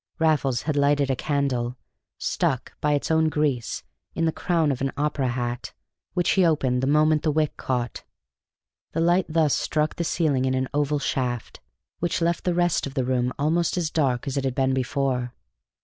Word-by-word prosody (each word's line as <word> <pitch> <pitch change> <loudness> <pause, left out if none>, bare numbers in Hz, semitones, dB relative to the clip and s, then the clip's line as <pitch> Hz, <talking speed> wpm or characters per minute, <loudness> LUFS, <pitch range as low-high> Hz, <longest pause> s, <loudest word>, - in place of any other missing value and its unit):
Raffles 150 -6 +1
had 155 -1 -1
lighted 140 -1 +3
a - - +1
candle, 130 -4 -1 0.4
stuck - - -1
(by 150 0 +2
its 145 +2 -1
own 160 0 +3
grease) 145 -6 -1 0.3
in 165 - +1
the 160 - +2
crown 165 -3 +1
of 130 - -3
an 135 0 0
opera 145 -2 0
hat, 120 0 -3 0.4
which 175 -1 +2
he 190 - +4
opened 135 -7 +2
the 130 - 0
moment 150 +1 +4
the 155 - +1
wick 155 0 0
caught. 125 -2 -3 0.9
The - - -1
light 175 +2 +3
thus 155 -2 +2
struck 155 0 0
the 170 - 0
ceiling 150 -6 +1
in 130 0 +1
an 130 0 0
oval 145 0 +1
shaft, 125 -4 -2 0.4
which 175 +1 0
left 170 0 0
the 180 -2 +1
rest 175 -4 +1
of 135 - -9
the 130 -3 0
room 125 -1 +1
almost 165 +5 +1
as 165 -3 -1
dark 130 -6 +1
as 135 - -2
it 135 - 0
had 130 -2 -1
been 135 -1 +2
before. 130 -1 -1
145 Hz, 190 wpm, -25 LUFS, 130-160 Hz, 0.9 s, he